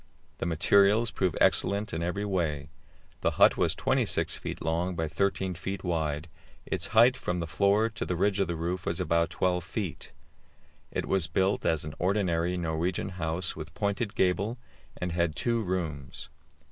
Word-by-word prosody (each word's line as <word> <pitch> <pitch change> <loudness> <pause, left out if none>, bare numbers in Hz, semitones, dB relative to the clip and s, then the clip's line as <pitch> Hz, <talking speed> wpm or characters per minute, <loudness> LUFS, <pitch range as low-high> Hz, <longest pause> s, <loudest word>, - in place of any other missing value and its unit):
The - - -1
materials 100 +7 +4
proved 90 -4 0
excellent 100 +1 +2
in 80 - -2
every 90 +4 -2
way. 80 -8 -1 0.5
The - - 0
hut - - +7
was - - +1
26 - - +1
feet - - -6
long 85 +3 -1
by 80 -1 -1
13 95 +3 0
feet 95 +2 -5
wide; 80 -3 -1 0.4
its 95 +1 -2
height 120 +3 +7
from 90 -8 -2
the 85 - -2
floor 100 +6 +3
to 115 0 -5
the 90 - -2
ridge 100 +3 +1
of 95 - +2
the 85 - -2
roof 85 +3 -3
was 85 - -1
about 85 -1 +2
12 90 0 0
feet. 95 -2 -5 0.8
It - - -2
was 95 -4 +1
built 95 +5 +1
as 80 -2 +1
an 75 - -6
ordinary 90 -2 +1
Norwegian 85 +3 -1
house, 85 0 -3
with 80 -1 -8
pointed 100 +1 -1
gable, 100 +6 +1 0.4
and 90 -1 -3
had 85 -2 0
two 115 +5 0
rooms. 85 -8 -4
90 Hz, 170 wpm, -29 LUFS, 80-100 Hz, 0.8 s, hut